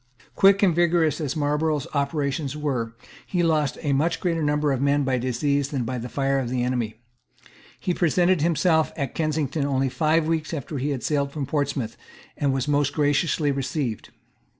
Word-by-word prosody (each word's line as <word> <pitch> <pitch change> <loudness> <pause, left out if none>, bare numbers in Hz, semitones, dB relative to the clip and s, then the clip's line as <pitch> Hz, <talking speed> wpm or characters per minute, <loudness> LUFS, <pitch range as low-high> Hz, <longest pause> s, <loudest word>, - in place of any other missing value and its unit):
Quick 195 +1 +5
and 180 -5 +4
vigorous 170 -2 +2
as 145 -4 -2
Marlborough's 150 0 0
operations 140 0 -1
were, 125 -6 -2 0.3
he 175 -2 0
lost 155 -4 +1
a 145 -2 +1
much 155 +5 +1
greater 165 -3 0
number 150 0 +1
of 135 -1 -1
men 140 +1 +2
by 130 -2 0
disease 140 +3 0
than 135 -4 -2
by 125 +1 -3
the 120 +2 -6
fire 135 0 0
of 125 -3 -3
the 125 -1 -1
enemy. 120 -3 -1 0.8
He 180 - -1
presented 175 0 +2
himself 160 0 +2
at 140 -3 -3
Kensington 155 -2 -1
only 135 -1 +1
five 155 +4 +2
weeks 160 0 -1
after 145 0 -5
he 140 +3 -1
had 135 -4 -3
sailed 140 -2 0
from 145 -1 -3
Portsmouth, 140 -4 -2 0.4
and 140 -2 0
was 135 +1 -1
most 145 -1 +1
graciously 145 0 +1
received. 135 -3 -3
145 Hz, 175 wpm, -24 LUFS, 135-160 Hz, 0.8 s, Quick